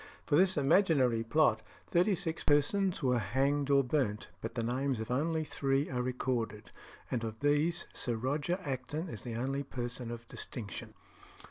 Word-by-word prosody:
For 145 - +2
this 185 +2 +4
imaginary 135 - +3
plot 115 -3 +3 0.2
thirty 180 +4 +3
six 160 -1 -3
persons 170 +5 +2
were 125 -2 +3
hanged 135 +7 +1
or 140 -1 +5
burnt; 125 -6 -1
but 115 +2 -5
the 115 - -1
names 130 +1 0
of 110 +2 -4
only 160 +5 +1
three 140 -1 0
are 125 -1 0
recorded, 120 -4 -2 0.4
and 120 -3 -1
of 110 -1 -5
these 150 +4 +2
Sir 120 - -1
Roger 145 +9 -1
Acton 145 +4 -3
is 115 - -4
the 120 -2 -5
only 135 +4 -1
person 125 -3 -4
of 115 0 -7
distinction. 110 -1 -6
135 Hz, 160 wpm, -32 LUFS, 120-150 Hz, 0.4 s, or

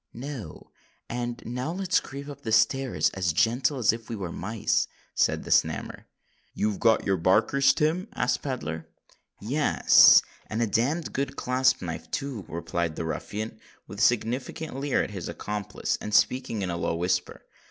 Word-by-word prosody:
"No. 120 - -8 0.4
And 120 0 -4
now 125 +6 -3
let's 190 +1 +1
creep 140 +1 -8
up 140 -6 -6
stairs 115 - +2
as 90 -4 -1
gentle 125 - +2
as 115 -4 +3
if 115 -1 -8
we 115 - -3
was 95 -5 -5
mice," 110 +5 -1 0.3
said - - +1
the - - -7
Snammer. - - +1 0.5
"You've 105 -1 -1
got 115 -1 +3
your 95 -1 +2
barkers, 105 +10 +4
Tim?" 165 +6 0
asked 125 - 0
Pedler. 80 - -4 0.5
"Yes—and 115 -2 +4
a 120 - +3
damned 135 - 0
good 135 0 -2
clasp 130 -2 +1
knife 85 -2 -6
too," 135 -8 -4
replied 85 0 -3
the 80 - -4
ruffian, 105 +6 -5 0.3
with 100 - -9
a - - -1
significant 125 +6 0
leer 140 0 0
at - - -6
his 95 -4 -5
accomplice, 105 -1 -3
and 105 0 -2
speaking 115 -5 +2
in 90 - -2
a 85 - -3
low 85 - -1
whisper. 90 +2 -2
115 Hz, 160 wpm, -27 LUFS, 100-135 Hz, 0.5 s, barkers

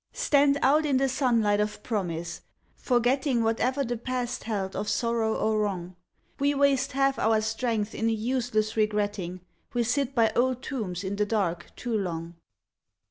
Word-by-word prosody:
Stand 285 -1 +3
out 295 +4 +4
in 285 -3 +2
the 270 +1 +2
sunlight 235 -6 +2
of 210 0 -2
Promise, 175 -6 -3 0.3
forgetting 250 0 +1
Whatever 250 +5 +1
the 240 -1 -2
Past 250 +1 -3
held 200 -4 -2
of 210 - -2
sorrow 225 +1 0
or 215 0 +1
wrong. 185 -4 -2 0.4
We 285 +1 +2
waste 275 -2 +2
half 275 0 +2
our 220 0 +3
strength 220 -1 -1
in 225 - 0
a - - +2
useless 225 -1 -1
regretting; 205 -4 -1 0.3
We 240 - +2
sit 275 +3 0
by 225 -2 +4
old 255 +1 +1
tombs 200 -8 -4
in 195 +1 -3
the 210 - +2
dark 180 -6 -1
too 240 -2 -3
long. 170 -4 -3
225 Hz, 160 wpm, -27 LUFS, 205-255 Hz, 0.4 s, out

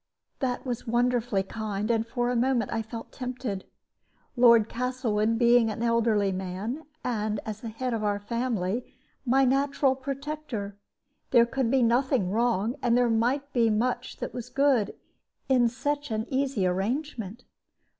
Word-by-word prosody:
This 250 -1 -2
was 245 -3 -4
wonderfully 240 -3 +1
kind, 215 +1 -3
and 225 0 0
for 240 +1 -1
a - - -1
moment 240 -2 +1
I 225 - 0
felt 225 +1 -8
tempted. 250 -6 -4 0.7
Lord 235 -3 +6
Castlewood 230 -3 0
being 235 -1 +5
an 220 +2 -4
elderly 230 -4 +2
man, 190 - -4 0.2
and, 215 -3 -1
as 215 0 -5
the 230 - -5
head 250 +3 -3
of 220 -2 -2
our 205 -1 +1
family, 230 -1 -2 0.3
my 265 +2 +4
natural 275 +1 +2
protector, 270 -6 -5 0.5
there 235 -2 +6
could 250 0 -1
be 265 0 +3
nothing 240 -4 +2
wrong, 230 +2 +1
and 240 -1 +3
there 245 -1 +3
might 260 +5 0
be 235 -2 +3
much 230 +4 -1
that - - -5
was 245 0 -6
good, 265 -6 +2 0.5
in 250 -3 +4
such 290 +4 -2
an 220 0 -1
easy 265 -7 0
arrangement. 225 +3 -2
235 Hz, 150 wpm, -27 LUFS, 215-255 Hz, 0.7 s, Lord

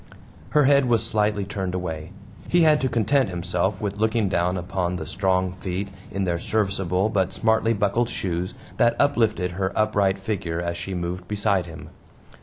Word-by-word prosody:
Her 150 +5 +4
head 140 0 +5
was 115 -2 +2
slightly 105 -2 +1
turned 95 -2 -3
away. 80 -2 -4 0.4
He 175 -1 +4
had 155 -1 +5
to 130 - +1
content 120 +2 +2
himself 90 +2 -1
with 100 -1 -3
looking 110 -1 +1
down 90 +1 +1
upon 90 0 -2
the 80 - -4
strong 95 +2 0
feet 95 +1 -4 0.2
in 100 - -2
their 85 -2 0
serviceable 95 -2 0
but 95 -3 0
smartly 110 +1 +2
buckled 105 +4 +1
shoes 90 0 -3 0.2
that 120 0 +4
uplifted 110 -9 +2
her 95 +2 -2
upright 105 -3 +2
figure 95 -5 -3
as 85 0 -2
she 90 +2 -5
moved 90 +1 -4
beside 100 -3 0
him. 80 -1 -10
95 Hz, 170 wpm, -24 LUFS, 90-110 Hz, 0.4 s, head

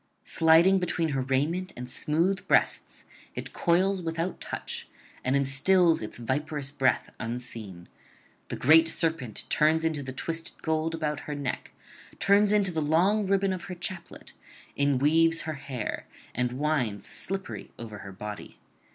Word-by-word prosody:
Sliding 165 +4 +5
between 170 -2 -1
her 135 -2 -1
raiment 150 +8 -1
and 125 0 -6
smooth 165 +9 0
breasts, - - +1 0.3
it - - -6
coils 185 +3 +2
without 165 +2 -3
touch, - - -6 0.4
and 130 +1 +1
instils 160 +6 +4
its 110 - -6
viperous 140 +3 -3
breath 135 -2 +1
unseen; 110 -6 -5 0.6
the - - -4
great 160 +4 +6
serpent 160 -10 -1
turns 160 +2 +3
into 160 -3 0
the 130 -1 -6
twisted 165 +5 -5
gold 160 0 0
about 150 -2 -2
her 150 - -2
neck, 140 -3 -4 0.5
turns 200 +1 +4
into 205 -3 +3
the 160 -2 -1
long 185 +7 +2
ribbon 195 0 +2
of 185 - -6
her 180 - -6
chaplet, 175 0 -8 0.4
inweaves 150 +4 +3
her 160 - -4
hair, 135 -6 -5 0.3
and 125 0 -1
winds 130 -7 -1
slippery 185 - -3
over 110 -3 -8
her 100 - -9
body. 105 +2 -8
155 Hz, 145 wpm, -28 LUFS, 130-170 Hz, 0.6 s, great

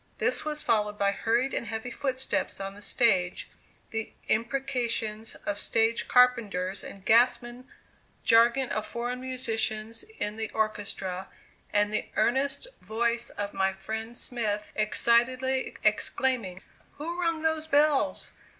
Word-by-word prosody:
This - - +1
was 300 0 -3
followed 210 -1 +1
by 200 -1 +2
hurried 235 +6 0
and 230 - -2
heavy 220 +3 -4
footsteps 265 -4 -2
on 195 0 -4
the 205 - -13
stage, 185 -6 +2 0.4
the 225 0 -3 0.2
imprecations 230 -3 -1
of 205 0 -2
stage 225 +1 +1
carpenters 215 -7 +3
and 195 -1 -10
gasmen, 240 +2 +3 0.6
jargon 235 +3 +5
of 215 - -2
foreign 245 +1 -3
musicians 225 -3 -2 0.2
in 210 +1 -3
the 220 -1 -3
orchestra, 200 -4 -2 0.4
and 205 0 +2
the 215 - -1
earnest 270 - +1 0.2
voice 235 +4 0
of 205 0 -4
my 190 0 +1
friend 220 +4 -5
Smith 210 -4 -3
excitedly 250 +4 +2
exclaiming: 225 -9 0 0.3
"Who 340 +4 -4
rung 335 -2 0
those 315 -1 0
bells? 295 -1 +2
230 Hz, 125 wpm, -28 LUFS, 210-255 Hz, 0.6 s, jargon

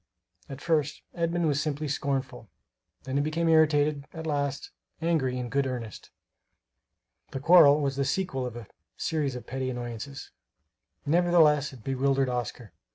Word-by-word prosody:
At 135 0 -8
first, 155 -3 0
Edmund 170 0 0
was 145 -1 +1
simply 150 0 -2
scornful; 135 -5 -3 0.5
then 135 +1 -3
he - - +3
became 160 +3 -1
irritated 150 -2 +3
at 160 -1 -7
last, 145 -2 -2 0.3
angry 155 -6 0
in 125 -1 -3
good 135 +2 0
earnest. 120 -4 -6 1.2
The 135 - -5
quarrel 150 -1 +7
was 140 -2 -1
the 140 - +1
sequel 135 -7 -1
of 120 - -8
a 120 -2 -8 0.3
series 145 -5 -1
of 125 - -8
petty 130 0 -3
annoyances. 125 +2 -6 0.7
Nevertheless 155 -3 +4
it 125 -5 -14
bewildered 135 +1 +1
Oscar. 120 -3 -4
140 Hz, 145 wpm, -27 LUFS, 130-155 Hz, 1.2 s, quarrel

